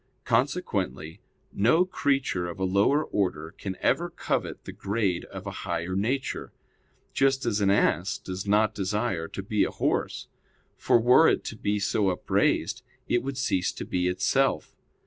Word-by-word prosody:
Consequently, 80 Hz, +5 st, -1 dB, 0.3 s
no 125 Hz, -, +4 dB
creature 140 Hz, -, 0 dB
of 85 Hz, -, -7 dB
a -, -, -1 dB
lower 100 Hz, +11 st, +3 dB
order 85 Hz, -, -2 dB
can 95 Hz, -2 st, -5 dB
ever 175 Hz, +1 st, +1 dB
covet -, -, -3 dB
the -, -, -7 dB
grade 100 Hz, -4 st, -1 dB
of 95 Hz, 0 st, -9 dB
a 100 Hz, -, -4 dB
higher 85 Hz, +2 st, -3 dB
nature; 125 Hz, +8 st, -2 dB, 0.6 s
just 135 Hz, 0 st, +2 dB
as 105 Hz, -3 st, 0 dB
an 100 Hz, -, +3 dB
ass 95 Hz, -1 st, +2 dB
does 95 Hz, +2 st, -6 dB
not 105 Hz, +1 st, +3 dB
desire 100 Hz, -3 st, -1 dB
to 95 Hz, -, -7 dB
be 105 Hz, +1 st, +1 dB
a -, -, 0 dB
horse: -, -, -1 dB, 0.5 s
for -, -, +3 dB
were 125 Hz, +7 st, +6 dB
it -, -, 0 dB
to -, -, -6 dB
be 105 Hz, 0 st, -1 dB
so 100 Hz, 0 st, +1 dB
upraised, 90 Hz, -, 0 dB, 0.3 s
it 120 Hz, -, +2 dB
would 135 Hz, +1 st, -5 dB
cease 95 Hz, -9 st, 0 dB
to -, -, -6 dB
be 90 Hz, 0 st, 0 dB
itself. 90 Hz, 0 st, +1 dB
100 Hz, 160 wpm, -27 LUFS, 90-120 Hz, 0.6 s, were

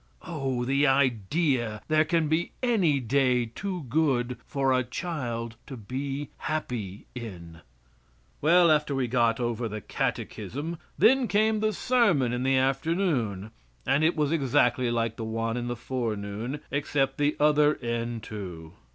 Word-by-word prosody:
Oh! 135 Hz, -8 st, -2 dB
the 140 Hz, +3 st, +3 dB
idea 130 Hz, -, +1 dB
there 155 Hz, 0 st, +3 dB
can 165 Hz, -1 st, +1 dB
be 160 Hz, +3 st, 0 dB
any 190 Hz, -, +3 dB
day 125 Hz, 0 st, +2 dB
too 180 Hz, -, -5 dB
good 125 Hz, -3 st, +1 dB
for 135 Hz, -2 st, +1 dB
a 130 Hz, 0 st, +2 dB
child 120 Hz, -5 st, -4 dB
to 135 Hz, -, -7 dB
be 135 Hz, +6 st, -4 dB
happy 115 Hz, -11 st, -4 dB
in! 85 Hz, -9 st, -8 dB, 0.8 s
Well, 170 Hz, +2 st, +5 dB
after 150 Hz, -2 st, +2 dB
we 130 Hz, -2 st, 0 dB
got 120 Hz, -1 st, +2 dB
over 120 Hz, -1 st, -1 dB
the 110 Hz, 0 st, -5 dB
catechism, 155 Hz, +9 st, -3 dB, 0.2 s
then 260 Hz, 0 st, +5 dB
came 215 Hz, +1 st, +2 dB
the 215 Hz, 0 st, +1 dB
sermon 200 Hz, -, +2 dB
in 125 Hz, -, -1 dB
the 135 Hz, +1 st, +2 dB
afternoon, 135 Hz, -, 0 dB, 0.3 s
and 140 Hz, +3 st, +2 dB
it 165 Hz, +2 st, +3 dB
was 150 Hz, -2 st, +1 dB
exactly 130 Hz, -4 st, +2 dB
like 115 Hz, -1 st, -1 dB
the 115 Hz, -, -4 dB
one 115 Hz, +1 st, -2 dB
in 120 Hz, -1 st, -3 dB
the 120 Hz, -, -2 dB
forenoon, 115 Hz, +1 st, -4 dB
except 140 Hz, -1 st, 0 dB
the 145 Hz, +1 st, +2 dB
other 150 Hz, 0 st, +4 dB
end 115 Hz, -1 st, -3 dB
to. 90 Hz, -8 st, -7 dB
130 Hz, 145 wpm, -27 LUFS, 115-155 Hz, 0.8 s, Well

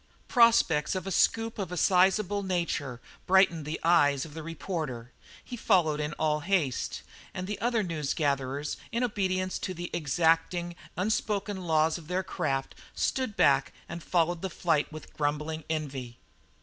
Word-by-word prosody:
Prospects 225 Hz, -, +4 dB
of 185 Hz, -, -3 dB
a 195 Hz, -, -4 dB
scoop 225 Hz, +4 st, +1 dB
of 190 Hz, -3 st, -3 dB
a 180 Hz, -, -4 dB
sizable 195 Hz, +3 st, +3 dB
nature 170 Hz, -9 st, -2 dB, 0.3 s
brightened 180 Hz, -5 st, +4 dB
the 155 Hz, +2 st, -4 dB
eyes 145 Hz, -5 st, +4 dB
of 155 Hz, -, -11 dB
the 160 Hz, -, -6 dB
reporter. 155 Hz, -7 st, -5 dB, 0.3 s
He 250 Hz, -, -7 dB
followed 175 Hz, -9 st, +2 dB
in 150 Hz, 0 st, -2 dB
all 150 Hz, 0 st, 0 dB
haste, 155 Hz, -6 st, -1 dB, 0.3 s
and 185 Hz, -, -3 dB
the 205 Hz, +1 st, -5 dB
other 235 Hz, -1 st, +1 dB
news 155 Hz, -6 st, -2 dB
gatherers, 140 Hz, -1 st, -1 dB
in 235 Hz, +2 st, 0 dB
obedience 185 Hz, -5 st, -1 dB
to 185 Hz, -, -4 dB
the 175 Hz, +1 st, -6 dB
exacting, 165 Hz, +3 st, +1 dB, 0.2 s
unspoken 205 Hz, -1 st, -1 dB
laws 160 Hz, +1 st, +2 dB
of 155 Hz, -, -14 dB
their 180 Hz, +2 st, -1 dB
craft, 135 Hz, -8 st, -2 dB, 0.2 s
stood 255 Hz, -6 st, -1 dB
back -, -, +3 dB
and 170 Hz, 0 st, -6 dB
followed 170 Hz, 0 st, +1 dB
the 190 Hz, -, -2 dB
flight 165 Hz, -4 st, 0 dB
with 155 Hz, -1 st, -10 dB
grumbling 150 Hz, +2 st, -2 dB
envy. 135 Hz, -6 st, -4 dB
170 Hz, 155 wpm, -29 LUFS, 150-190 Hz, 0.3 s, Prospects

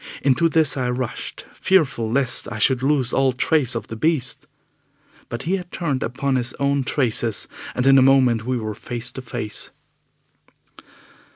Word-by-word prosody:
Into 145 Hz, +5 st, +3 dB
this 155 Hz, -2 st, +2 dB
I 125 Hz, -2 st, -1 dB
rushed, 125 Hz, -1 st, -4 dB
fearful 140 Hz, -12 st, +1 dB
lest 130 Hz, -2 st, +1 dB
I 110 Hz, -, -4 dB
should 125 Hz, +3 st, +3 dB
lose 135 Hz, -3 st, +1 dB
all 135 Hz, -1 st, +3 dB
trace 130 Hz, -1 st, +1 dB
of 115 Hz, -, -3 dB
the 115 Hz, -, -7 dB
beast. 140 Hz, +1 st, 0 dB, 0.8 s
But 120 Hz, +2 st, -5 dB
he 185 Hz, +4 st, 0 dB
had 180 Hz, -2 st, -9 dB
turned 145 Hz, -7 st, -2 dB
upon 130 Hz, +3 st, -1 dB
his 120 Hz, -1 st, -2 dB
own 140 Hz, 0 st, 0 dB
traces, 120 Hz, -6 st, 0 dB, 0.3 s
and 125 Hz, -, 0 dB
in 135 Hz, 0 st, +7 dB
a -, -, +5 dB
moment 130 Hz, -4 st, +4 dB
we 125 Hz, +2 st, -1 dB
were 110 Hz, -2 st, -4 dB
face 120 Hz, +3 st, -5 dB
to 130 Hz, -, -7 dB
face. 105 Hz, -4 st, -4 dB
130 Hz, 165 wpm, -22 LUFS, 120-140 Hz, 0.8 s, in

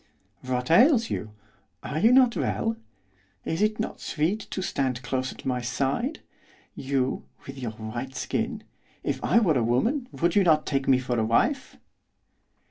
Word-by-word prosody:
'What 125 Hz, +1 st, -2 dB
ails 240 Hz, -, +5 dB
you? 105 Hz, -, -3 dB, 0.5 s
Are 155 Hz, -, -3 dB
you 225 Hz, +7 st, +5 dB
not 250 Hz, -2 st, +5 dB
well? 225 Hz, 0 st, -1 dB, 0.7 s
Is 165 Hz, +4 st, -2 dB
it 215 Hz, 0 st, +1 dB
not 220 Hz, -, -4 dB
sweet 170 Hz, +7 st, -1 dB
to 190 Hz, -, -3 dB
stand 130 Hz, -6 st, -1 dB
close 130 Hz, +1 st, -2 dB
at -, -, -13 dB
my 125 Hz, -1 st, -1 dB
side? 140 Hz, -, -2 dB, 0.5 s
You, 135 Hz, -1 st, -2 dB, 0.2 s
with 135 Hz, 0 st, -8 dB
your 120 Hz, -4 st, -4 dB
white 120 Hz, +4 st, -6 dB
skin, 225 Hz, -1 st, -2 dB, 0.4 s
if -, -, -2 dB
I -, -, +3 dB
were 170 Hz, -, +4 dB
a -, -, +1 dB
woman, 235 Hz, -, 0 dB
would 170 Hz, 0 st, 0 dB
you 200 Hz, -, +5 dB
not 155 Hz, -3 st, +3 dB
take 135 Hz, -2 st, -1 dB
me 130 Hz, -, +5 dB
for 125 Hz, -2 st, -1 dB
a -, -, +2 dB
wife? 235 Hz, -, +1 dB
140 Hz, 165 wpm, -26 LUFS, -, 0.7 s, ails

